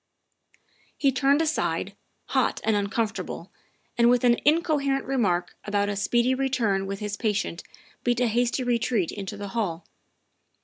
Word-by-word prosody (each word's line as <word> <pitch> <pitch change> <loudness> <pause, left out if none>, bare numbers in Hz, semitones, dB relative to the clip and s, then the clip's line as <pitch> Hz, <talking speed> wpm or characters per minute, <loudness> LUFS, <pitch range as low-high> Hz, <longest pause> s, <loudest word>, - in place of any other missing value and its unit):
' - - -38
' - - -34
He 275 -2 +3
turned 280 +4 +3
aside, 315 -1 -1 0.3
hot - - +1
and 220 -1 +2
uncomfortable, 215 +2 -2 0.5
and 235 0 +6
with 245 0 +3
an 240 -1 +5
incoherent 295 -3 +2
remark 185 -10 0
about 205 -1 0
a 205 - -2
speedy 240 +5 +2
return 240 -8 0
with 195 +1 -5
his 210 -1 -3
pa 225 - -2
tient 200 -5 -1 0.4
beat 240 0 +1
a 250 - +3
hasty 240 +3 +1
retreat 235 -6 0
into 200 0 -6
the 200 0 -6
hall. 190 -7 -2
235 Hz, 160 wpm, -26 LUFS, 205-260 Hz, 0.5 s, and